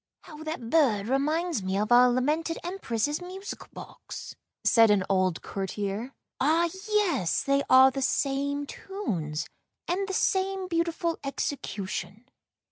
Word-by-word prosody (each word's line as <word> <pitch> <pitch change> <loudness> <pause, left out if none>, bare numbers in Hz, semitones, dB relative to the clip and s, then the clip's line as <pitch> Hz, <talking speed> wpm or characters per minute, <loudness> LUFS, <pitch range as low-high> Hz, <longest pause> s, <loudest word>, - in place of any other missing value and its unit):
" - - -63
How 305 -1 -11
that 310 -7 -5
bird 230 -11 +3
reminds 305 - 0
me 190 +1 -1
of 210 +3 -1
our 250 +1 +7
lamented 300 +7 0
Empress's 295 - -2
musical 380 +3 -7
box," - - -9 0.3
said 230 -2 +6
an 205 -2 +4
old 185 -3 +1
courtier. 200 +4 -4
" - - -61
Ah, 325 +5 +3 0.2
yes, 365 - +1
they 275 0 +2
are 260 +1 +8
the 270 - -4
same 280 +1 0
tunes, 185 - -4 0.4
and 385 +3 -1
the 385 - -4
same 380 -1 +1
beautiful 335 -1 -1
execution." 225 -6 -4
275 Hz, 135 wpm, -27 LUFS, 220-335 Hz, 0.4 s, are